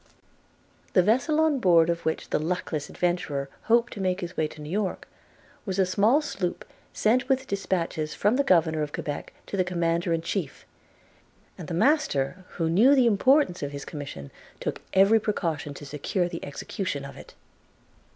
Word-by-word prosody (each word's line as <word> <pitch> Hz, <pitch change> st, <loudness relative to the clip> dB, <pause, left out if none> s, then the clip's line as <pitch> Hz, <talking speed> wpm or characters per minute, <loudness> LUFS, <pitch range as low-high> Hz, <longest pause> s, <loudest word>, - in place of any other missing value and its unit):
The 185 Hz, -, +5 dB
vessel 260 Hz, -, +2 dB
on 315 Hz, -3 st, +3 dB
board 170 Hz, -6 st, +5 dB
of 170 Hz, 0 st, -2 dB
which 160 Hz, -, -2 dB
the -, -, +2 dB
luckless 155 Hz, -2 st, -3 dB
adventurer 155 Hz, -6 st, -1 dB, 0.2 s
hoped 235 Hz, +1 st, +3 dB
to 200 Hz, -, -6 dB
make 185 Hz, -1 st, 0 dB
his 175 Hz, +1 st, -6 dB
way 155 Hz, -, +1 dB
to 150 Hz, -, -14 dB
New 150 Hz, +1 st, -7 dB
York, 200 Hz, -1 st, -2 dB, 0.6 s
was 190 Hz, -3 st, -3 dB
a 190 Hz, -, +4 dB
small 215 Hz, +11 st, +3 dB
sloop 185 Hz, -11 st, -3 dB, 0.3 s
sent 250 Hz, +5 st, +1 dB
with 265 Hz, 0 st, +2 dB
dispatches 170 Hz, -7 st, -2 dB
from 210 Hz, +8 st, +2 dB
the 280 Hz, -, +2 dB
Governor 160 Hz, -, +3 dB
of 150 Hz, -1 st, -3 dB
Quebec 145 Hz, -1 st, -5 dB
to -, -, -5 dB
the 185 Hz, -, +2 dB
Commander 170 Hz, -1 st, 0 dB
in 165 Hz, 0 st, 0 dB
Chief; 170 Hz, -5 st, -4 dB, 0.9 s
and 170 Hz, -, -9 dB
the 170 Hz, -, -3 dB
master, 185 Hz, -, +1 dB
who 165 Hz, -, 0 dB
knew 220 Hz, +12 st, +5 dB
the 260 Hz, -3 st, +4 dB
importance 235 Hz, -1 st, +3 dB
of 145 Hz, 0 st, -4 dB
his 140 Hz, -1 st, -6 dB
commission, 140 Hz, -, -7 dB, 0.3 s
took -, -, -4 dB
every 195 Hz, +4 st, +6 dB
precaution 160 Hz, -9 st, -2 dB
to 145 Hz, -, -9 dB
secure 150 Hz, +5 st, -1 dB
the 170 Hz, -1 st, -7 dB
execution 145 Hz, +1 st, -4 dB
of 140 Hz, -, -9 dB
it. -, -, -13 dB
180 Hz, 175 wpm, -26 LUFS, 155-210 Hz, 0.9 s, every